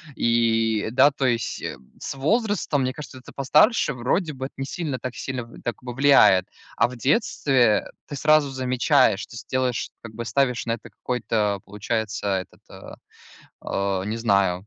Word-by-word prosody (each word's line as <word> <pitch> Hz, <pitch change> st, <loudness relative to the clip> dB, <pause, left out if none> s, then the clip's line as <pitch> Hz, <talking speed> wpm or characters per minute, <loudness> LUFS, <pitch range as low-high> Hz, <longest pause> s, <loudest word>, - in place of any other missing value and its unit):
И, 115 Hz, -2 st, +1 dB
да, 135 Hz, +3 st, +6 dB
то 135 Hz, -1 st, -3 dB
есть, 115 Hz, -4 st, -1 dB
м, 65 Hz, -, -7 dB
с -, -, -5 dB
возрастом, 185 Hz, -, 0 dB
мне 130 Hz, 0 st, -1 dB
кажется, 145 Hz, -3 st, -9 dB
это 125 Hz, -, -13 dB
постарше 150 Hz, -, +3 dB
вроде 150 Hz, +7 st, -1 dB
бы 130 Hz, 0 st, -5 dB
это -, -, -8 dB
не 135 Hz, -, -3 dB
сильно, 145 Hz, -3 st, -4 dB
так 125 Hz, -1 st, -6 dB
сильно 130 Hz, -2 st, -4 dB
в 115 Hz, -, -14 dB
так 120 Hz, -, -4 dB
во 125 Hz, -1 st, -6 dB
влияет. 130 Hz, -9 st, +5 dB, 0.3 s
А 115 Hz, -, +4 dB
в 125 Hz, -, -9 dB
детстве 130 Hz, -, +2 dB, 0.2 s
ты 145 Hz, -, -6 dB
сразу 150 Hz, 0 st, +3 dB
замечаешь, 130 Hz, -3 st, +2 dB
то -, -, -17 dB
есть 115 Hz, -1 st, -10 dB
делаешь, 130 Hz, -3 st, -1 dB
как 115 Hz, -2 st, -10 dB
бы 115 Hz, +1 st, -6 dB
ставишь 125 Hz, -2 st, 0 dB
на 115 Hz, -, +1 dB
это 115 Hz, -, -8 dB
какой-то, 110 Hz, -5 st, -1 dB
получается, 105 Hz, +1 st, -3 dB
этот, -, -, -16 dB
а, -, -, -11 dB, 1.1 s
а, -, -, -5 dB
не 110 Hz, +2 st, -3 dB
знаю,. 100 Hz, -4 st, +1 dB
125 Hz, 175 wpm, -24 LUFS, 115-140 Hz, 1.1 s, да